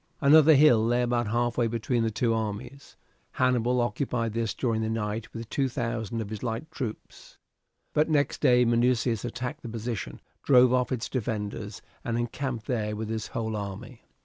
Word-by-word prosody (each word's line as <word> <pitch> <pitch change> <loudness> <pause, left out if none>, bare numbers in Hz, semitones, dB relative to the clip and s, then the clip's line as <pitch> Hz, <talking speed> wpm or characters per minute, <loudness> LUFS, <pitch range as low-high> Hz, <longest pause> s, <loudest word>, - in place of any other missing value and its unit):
Another 155 +1 +7
hill 135 -6 +6
lay 120 +2 +2
about 120 -1 0
halfway 120 +1 +1
between 115 +1 -1
the 115 - +1
two 115 +1 0
armies. 115 +5 -5 0.4
Hannibal 125 -1 +2
occupied 120 -2 -1
this 115 -1 -2
during 115 -3 0
the 110 - -1
night 110 0 -3
with 115 -1 -7
two 135 +3 0
thousand 115 -2 -3
of 105 -1 -6
his 110 - -5
light 120 +7 -4
troops, 120 -8 -7 0.6
but 155 +2 +2
next 145 -2 +1
day 125 0 +5
Minucius 120 -1 +2
attacked 120 +1 -5
the 120 - -7
position, 115 - -5 0.2
drove 125 -2 +5
off 125 0 +1
its 120 -3 -2
defenders, 105 -3 -4 0.2
and 115 -1 -2
encamped 120 -1 -3
there 105 -4 -2
with 110 0 -5
his 110 -1 -3
whole 110 -1 -3
army. 105 +4 -7
120 Hz, 170 wpm, -27 LUFS, 110-125 Hz, 0.6 s, Another